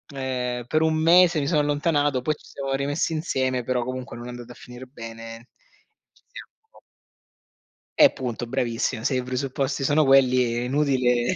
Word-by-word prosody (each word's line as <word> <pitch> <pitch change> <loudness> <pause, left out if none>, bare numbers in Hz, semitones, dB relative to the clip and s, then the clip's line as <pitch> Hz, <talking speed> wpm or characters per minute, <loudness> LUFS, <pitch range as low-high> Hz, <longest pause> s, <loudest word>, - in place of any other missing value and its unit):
ehm, 125 -2 -3
per 155 +3 +1
un 160 0 +2
mese 170 +1 +5
mi 140 - -1
sono 155 -2 +2
allontanato, 145 -2 0
poi 155 +5 0
ci - - -21
siamo 135 -1 -5
rimessi 140 +4 -1
insieme, 130 -5 -1
però 125 0 -1
comunque 130 0 -6
non 120 - -9
è - - -7
andata 120 0 -9
a - - -22
finire 125 +1 -11
bene, 115 -1 -10 0.6
ci - - -30
siamo 445 +3 -15 1.2
Eh, 290 -2 +8
punto, 120 -3 -4
bravissima, 120 -3 -2
se 130 - 0
i 125 - -1
presupposti 135 +2 -2
sono 145 +2 +3
quelli 130 -3 +4
è 120 - -1
inutile 125 0 +1
130 Hz, 170 wpm, -24 LUFS, 125-145 Hz, 1.2 s, Eh